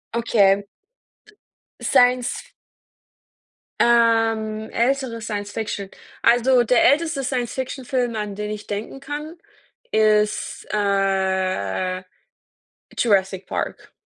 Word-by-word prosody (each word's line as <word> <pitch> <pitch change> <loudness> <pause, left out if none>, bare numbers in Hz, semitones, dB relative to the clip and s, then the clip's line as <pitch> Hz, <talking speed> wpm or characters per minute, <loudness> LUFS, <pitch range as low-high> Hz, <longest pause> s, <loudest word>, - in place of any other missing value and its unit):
Okay. 200 -4 +3 1.2
Sience-F 245 0 +2 1.3
Ähm, 225 -2 +2
ältere 250 -1 0
Science-Fiction. 205 -1 -4 0.3
Also, 245 +1 +4
der 240 +1 +3
älteste 310 -2 0
Science-Fiction-Film, 255 -1 -2
an 210 -2 -4
den 210 0 -4
ich 210 0 -7
denken 210 +6 -5
kann, 300 +4 -7 0.5
ist, 215 -1 +1
äh, 190 - 0 0.9
Jurassic 195 -4 +1
Park. - - -4
220 Hz, 75 wpm, -22 LUFS, 200-245 Hz, 1.3 s, Also